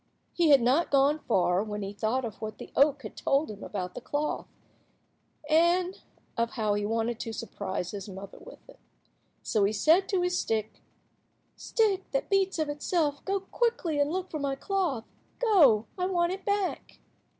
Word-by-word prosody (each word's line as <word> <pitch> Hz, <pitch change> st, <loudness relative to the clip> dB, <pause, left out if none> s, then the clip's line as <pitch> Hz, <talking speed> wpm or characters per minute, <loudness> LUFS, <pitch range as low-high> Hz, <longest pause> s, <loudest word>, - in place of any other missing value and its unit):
He 340 Hz, -3 st, +3 dB
had 275 Hz, -4 st, +6 dB
not 270 Hz, +8 st, +3 dB
gone 280 Hz, +2 st, +3 dB
far 185 Hz, -6 st, +1 dB
when 210 Hz, -1 st, -5 dB
he 195 Hz, +1 st, -5 dB
thought 220 Hz, +5 st, -1 dB
of 220 Hz, -2 st, -8 dB
what 215 Hz, -1 st, -5 dB
the -, -, -10 dB
oak 285 Hz, +1 st, +3 dB
had -, -, -8 dB
told 275 Hz, -2 st, +1 dB
him 205 Hz, -, -10 dB
about 180 Hz, -3 st, -4 dB
the -, -, -7 dB
cloth, 295 Hz, +1 st, -2 dB, 1.0 s
and 345 Hz, +4 st, +2 dB, 0.3 s
of 230 Hz, -1 st, -1 dB
how 215 Hz, -4 st, 0 dB
he 205 Hz, 0 st, -1 dB
wanted 225 Hz, +1 st, -1 dB
to 230 Hz, -, -4 dB
surprise 190 Hz, -4 st, -4 dB
his 200 Hz, 0 st, -7 dB
mother 195 Hz, +1 st, -9 dB
with -, -, -14 dB
it. -, -, -16 dB, 0.6 s
So 215 Hz, -4 st, +1 dB
he 200 Hz, +2 st, +2 dB
said 320 Hz, -, +3 dB
to 375 Hz, -3 st, +1 dB
his 360 Hz, 0 st, +1 dB
stick— 220 Hz, -1 st, -2 dB, 0.7 s
"Stick, 410 Hz, -4 st, 0 dB
that -, -, -1 dB
beats 385 Hz, -1 st, +2 dB
of 310 Hz, -1 st, 0 dB
itself, 290 Hz, 0 st, -1 dB
go 395 Hz, 0 st, 0 dB
quickly 385 Hz, -8 st, -1 dB
and 285 Hz, 0 st, +2 dB
look 370 Hz, +1 st, -3 dB
for 310 Hz, -, -3 dB
my 280 Hz, -1 st, -1 dB
cloth. 330 Hz, -, -1 dB, 0.3 s
Go, 300 Hz, -, +5 dB
I 365 Hz, -, +1 dB
want 350 Hz, -2 st, +1 dB
it 385 Hz, -, -6 dB
back." 405 Hz, -2 st, -2 dB
285 Hz, 180 wpm, -28 LUFS, 215-360 Hz, 1.0 s, had